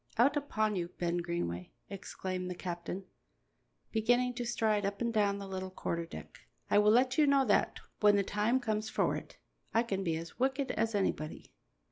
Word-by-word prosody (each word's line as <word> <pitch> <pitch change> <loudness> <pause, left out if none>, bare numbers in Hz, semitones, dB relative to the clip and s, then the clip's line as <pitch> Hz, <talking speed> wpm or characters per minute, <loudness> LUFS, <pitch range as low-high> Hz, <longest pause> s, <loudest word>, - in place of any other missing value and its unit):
"Out 265 +6 +5
upon 215 -7 0
you, 175 -2 -1
Ben 175 0 0
Greenway!" 170 - -3
exclaimed 185 -2 -5
the 180 - -4
captain, 175 +2 -5 0.9
beginning 245 +3 +2
to 245 0 -4
stride 215 -3 +1
up 200 0 -2
and 235 -1 0
down 205 -2 +2
the 200 -1 -6
little 190 -1 -4
quarter 170 -2 -3
deck. - - -10 0.3
"I - - +6
will 210 0 +5
let 255 +5 +4
you 300 - +6
know, 275 -1 +4
that 205 - +2 0.2
when 210 -1 +6
the 200 - +3
time 210 +6 +1
comes 220 -3 -1
for - - +1
it, - - -8 0.4
I 230 - +5
can 195 -5 -2
be 165 -3 0
as 165 +6 -8
wicked 265 +1 +1
as 225 0 0
anybody." 155 -6 -2
210 Hz, 185 wpm, -32 LUFS, 185-235 Hz, 0.9 s, I